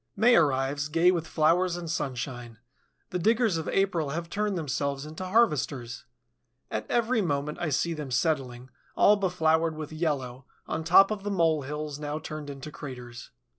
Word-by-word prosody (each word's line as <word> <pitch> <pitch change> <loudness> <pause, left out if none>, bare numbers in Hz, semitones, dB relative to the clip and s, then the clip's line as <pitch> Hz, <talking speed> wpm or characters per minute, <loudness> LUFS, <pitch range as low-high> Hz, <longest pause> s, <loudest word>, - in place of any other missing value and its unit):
May 235 +4 +5
arrives, 140 -1 +2
gay 165 +4 +4
with 165 -3 -2
flowers 170 +3 +2
and 175 -1 -6
sunshine. 125 -6 -4 0.5
The 180 - -1
diggers 225 0 +2
of 160 - -4
April 175 -6 +1
have 170 +3 -4
turned 210 -2 -1
themselves 140 -2 -2
into 155 +4 -7
harvesters. 150 - 0 0.7
At 110 0 -4
every 235 0 +2
moment 150 -4 -2
I 165 - 0
see 170 +4 0
them 150 -4 -6
settling, 130 -2 -1 0.2
all 210 - +6
befloured 165 -4 +1
with 155 -1 -7
yellow, 135 -5 -3 0.2
on 160 +1 -3
top 185 +5 +6
of 210 -2 -3
the 205 - -4
mole 165 -6 +2
hills 150 +1 -5
now 150 0 -3
turned 155 -2 -7
into 140 +2 -8
craters. 125 -5 -9
155 Hz, 165 wpm, -27 LUFS, 140-175 Hz, 0.7 s, all